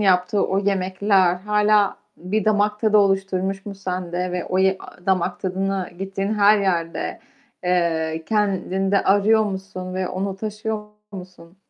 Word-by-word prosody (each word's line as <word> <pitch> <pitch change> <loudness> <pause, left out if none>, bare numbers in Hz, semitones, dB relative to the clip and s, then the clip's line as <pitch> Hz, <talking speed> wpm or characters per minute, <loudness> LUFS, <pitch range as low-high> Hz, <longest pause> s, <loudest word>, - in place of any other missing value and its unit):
yaptığı 190 0 +2
o 190 - 0
yemekler 190 -1 +2
hâlâ 210 +1 +2 0.2
bir 190 +4 -2
damak 210 0 +1
tadı 215 -2 +4
oluşturmuş 195 0 0
mu 200 - -5
sende 180 -1 -3
ve 180 -1 -2
o 185 - -1
ye 190 0 +3
a 180 - -14
damak 185 -2 0
tadına 190 0 -2
gittiğin 195 +2 -2
her 210 +1 +5
yerde, 170 -4 -2 0.4
eee, 165 -3 0
kendinde 195 -2 +1
arıyor 210 +3 +4
musun 190 -2 -5
ve 185 -1 -2
onu 195 +1 -3
taşıyor 215 +1 -4 0.3
musun? 180 -2 -11
195 Hz, 140 wpm, -22 LUFS, 185-205 Hz, 0.4 s, her